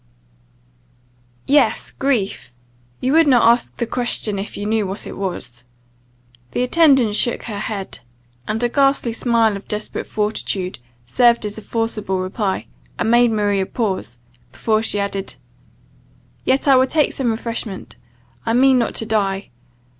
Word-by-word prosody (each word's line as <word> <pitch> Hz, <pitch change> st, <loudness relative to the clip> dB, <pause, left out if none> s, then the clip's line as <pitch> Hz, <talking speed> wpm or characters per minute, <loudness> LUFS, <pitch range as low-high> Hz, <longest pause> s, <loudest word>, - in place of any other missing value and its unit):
"Yes, 285 Hz, +1 st, +2 dB
grief; 230 Hz, -, -2 dB, 0.5 s
you 260 Hz, -, +1 dB
would 325 Hz, -1 st, +5 dB
not 245 Hz, -4 st, +5 dB
ask 235 Hz, +1 st, +2 dB
the 235 Hz, -, -1 dB
question 225 Hz, -4 st, -1 dB
if 200 Hz, -, -6 dB
you 205 Hz, -, -4 dB
knew 215 Hz, -1 st, 0 dB
what 195 Hz, +2 st, -6 dB
it -, -, -7 dB
was." 125 Hz, -11 st, -5 dB, 0.9 s
The 245 Hz, -, 0 dB
attendant 265 Hz, -6 st, +4 dB
shook 240 Hz, +2 st, +1 dB
her 210 Hz, -4 st, -5 dB
head; 200 Hz, -, -5 dB, 0.5 s
and 220 Hz, +2 st, -1 dB
a -, -, +4 dB
ghastly 275 Hz, -2 st, +2 dB
smile 230 Hz, -2 st, +2 dB
of 200 Hz, -, -9 dB
desperate 210 Hz, 0 st, -4 dB
fortitude 205 Hz, -, -2 dB, 0.3 s
served 235 Hz, -, +3 dB
as 210 Hz, +1 st, -4 dB
a -, -, -11 dB
forcible 215 Hz, -4 st, -2 dB
reply, 190 Hz, +1 st, -2 dB, 0.3 s
and 225 Hz, -, 0 dB
made 240 Hz, 0 st, +5 dB
Maria 205 Hz, -3 st, 0 dB
pause, 195 Hz, -, -3 dB, 0.3 s
before 215 Hz, -, 0 dB
she 210 Hz, -2 st, +1 dB
added 200 Hz, -1 st, -3 dB, 1.1 s
"Yet 265 Hz, +2 st, +1 dB
I 270 Hz, -2 st, +7 dB
will 260 Hz, +1 st, +4 dB
take 300 Hz, +1 st, +1 dB
some 260 Hz, -3 st, -1 dB
refreshment: 225 Hz, -3 st, -4 dB, 0.5 s
I 225 Hz, -, -1 dB
mean 260 Hz, +1 st, +5 dB
not 235 Hz, -, -1 dB
to 225 Hz, -, -2 dB
die. 200 Hz, -3 st, -1 dB
220 Hz, 145 wpm, -20 LUFS, 200-245 Hz, 1.1 s, I